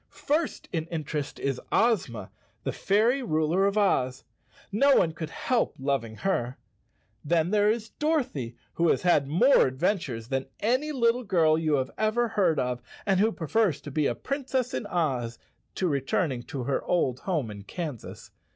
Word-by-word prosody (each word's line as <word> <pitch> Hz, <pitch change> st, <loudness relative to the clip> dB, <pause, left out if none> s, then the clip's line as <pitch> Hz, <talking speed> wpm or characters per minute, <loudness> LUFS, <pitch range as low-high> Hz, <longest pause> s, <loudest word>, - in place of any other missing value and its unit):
First 305 Hz, +2 st, -2 dB
in 160 Hz, -1 st, -2 dB
interest 155 Hz, -3 st, -4 dB
is 135 Hz, -2 st, -2 dB
Ozma, 160 Hz, -, +1 dB, 0.3 s
the -, -, -1 dB
fairy 230 Hz, +7 st, +2 dB
ruler 170 Hz, -2 st, +1 dB
of 200 Hz, +1 st, -1 dB
Oz. 130 Hz, -11 st, +1 dB, 0.5 s
No 275 Hz, +7 st, +4 dB
one 165 Hz, -, +3 dB
could 160 Hz, -1 st, -6 dB
help 245 Hz, +7 st, 0 dB
loving 135 Hz, -5 st, -2 dB
her. 125 Hz, -, -1 dB, 0.7 s
Then 165 Hz, +3 st, +1 dB
there 210 Hz, 0 st, +4 dB
is 220 Hz, 0 st, -1 dB
Dorothy, 245 Hz, -, -1 dB, 0.2 s
who 170 Hz, -1 st, +2 dB
has -, -, +2 dB
had 160 Hz, -6 st, +3 dB
more 185 Hz, -, +5 dB
adventures 130 Hz, -, -2 dB
than 135 Hz, -1 st, -1 dB
any 255 Hz, +8 st, +1 dB
little 245 Hz, -2 st, +2 dB
girl 165 Hz, -7 st, +3 dB
you 155 Hz, -2 st, +1 dB
have 130 Hz, -2 st, -1 dB
ever 220 Hz, +2 st, +1 dB
heard 185 Hz, -8 st, +2 dB
of 125 Hz, -1 st, -1 dB, 0.2 s
and 195 Hz, -2 st, +2 dB
who 220 Hz, +3 st, +3 dB
prefers 180 Hz, -3 st, 0 dB
to 145 Hz, -, -8 dB
be 150 Hz, 0 st, +1 dB
a 120 Hz, -, -1 dB
Princess 265 Hz, -, -2 dB
in 210 Hz, -, -3 dB
Oz 130 Hz, -, -1 dB, 0.4 s
to 185 Hz, -, 0 dB
returning 140 Hz, -, 0 dB
to 130 Hz, +1 st, -6 dB
her 135 Hz, +2 st, -1 dB
old 130 Hz, -8 st, 0 dB
home 155 Hz, -, -2 dB
in 100 Hz, -1 st, -8 dB
Kansas. 145 Hz, -, -7 dB
170 Hz, 165 wpm, -27 LUFS, 135-220 Hz, 0.7 s, more